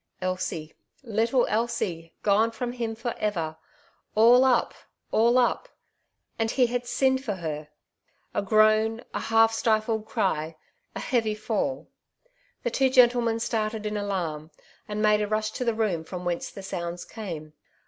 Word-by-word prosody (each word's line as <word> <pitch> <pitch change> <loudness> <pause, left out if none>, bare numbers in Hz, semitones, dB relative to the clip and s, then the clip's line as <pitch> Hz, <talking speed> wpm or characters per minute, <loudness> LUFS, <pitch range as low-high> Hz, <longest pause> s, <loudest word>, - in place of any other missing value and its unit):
'' - - -41
Elsie 165 -4 -4 0.2
— - - -37 0.2
little 235 +2 +3
Elsie 180 -7 -2
gone 210 +2 +4
from 240 +2 -4
him 230 -2 -3
for 235 +1 -3
ever! 170 -7 -1 0.6
All 235 +4 +7
up, 260 -2 +3 0.4
all 235 +3 +4
up! 255 - +1 0.7
And 225 0 +1
he 250 +2 +3
had 245 0 -2
sinned 265 +1 +2
for 210 -6 -2
her? 155 -4 -5 0.3
— - - -42
a - - 0
groan, 215 +2 +3
a - - -1
half 225 0 +4
stifled 220 -1 0
cry, 175 -8 -1 0.4
a - - -3
heavy 225 -5 0
fall! 220 +5 -2 0.8
The 240 - -1
twx) 265 +2 +2
gentlemen 240 -3 +4
started 215 -1 -2
in 210 0 -2
alarm, 175 -7 -3 0.4
and 210 0 -2
made 210 0 +4
a 210 - 0
rush 215 +1 -1
to 250 - -3
the 235 -2 0
room 200 -7 0
from 180 +2 -7
whence 175 -1 -2
the 195 - -10
sounds 175 -2 -5
came. 165 -8 -7
215 Hz, 160 wpm, -26 LUFS, 190-235 Hz, 0.8 s, All